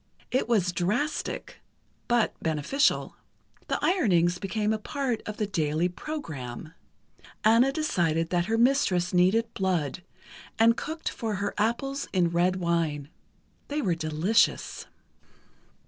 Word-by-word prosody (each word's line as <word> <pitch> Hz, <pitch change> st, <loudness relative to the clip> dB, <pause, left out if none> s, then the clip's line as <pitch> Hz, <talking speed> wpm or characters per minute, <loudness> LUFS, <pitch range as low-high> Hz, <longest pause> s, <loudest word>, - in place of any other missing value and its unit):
It 255 Hz, -1 st, 0 dB
was 195 Hz, -6 st, +2 dB
drastic, 210 Hz, -, -2 dB, 0.5 s
but 240 Hz, -2 st, +2 dB
beneficial. 160 Hz, -, +1 dB, 0.5 s
The -, -, 0 dB
ironings 180 Hz, -, +2 dB
became 210 Hz, +2 st, -1 dB
a 215 Hz, -, -2 dB
part 260 Hz, 0 st, -2 dB
of 210 Hz, -, -5 dB
the 215 Hz, -, 0 dB
daily 165 Hz, -3 st, 0 dB
program. 160 Hz, -, -7 dB, 0.7 s
Anna 230 Hz, +5 st, +5 dB
decided 170 Hz, -, 0 dB
that 175 Hz, -1 st, +1 dB
her 225 Hz, +3 st, 0 dB
mistress 215 Hz, -8 st, +2 dB
needed 210 Hz, +6 st, +3 dB
blood, 180 Hz, -5 st, -1 dB, 0.6 s
and 230 Hz, +1 st, +5 dB
cooked 315 Hz, +6 st, -4 dB
for 220 Hz, -3 st, -3 dB
her 200 Hz, +1 st, -2 dB
apples 270 Hz, +6 st, -1 dB
in 175 Hz, -3 st, +2 dB
red 175 Hz, +2 st, +2 dB
wine. 165 Hz, -5 st, -1 dB, 0.6 s
They 290 Hz, +1 st, -2 dB
were 195 Hz, -, +1 dB
delicious. 165 Hz, +7 st, +1 dB
195 Hz, 120 wpm, -27 LUFS, 170-235 Hz, 0.7 s, Anna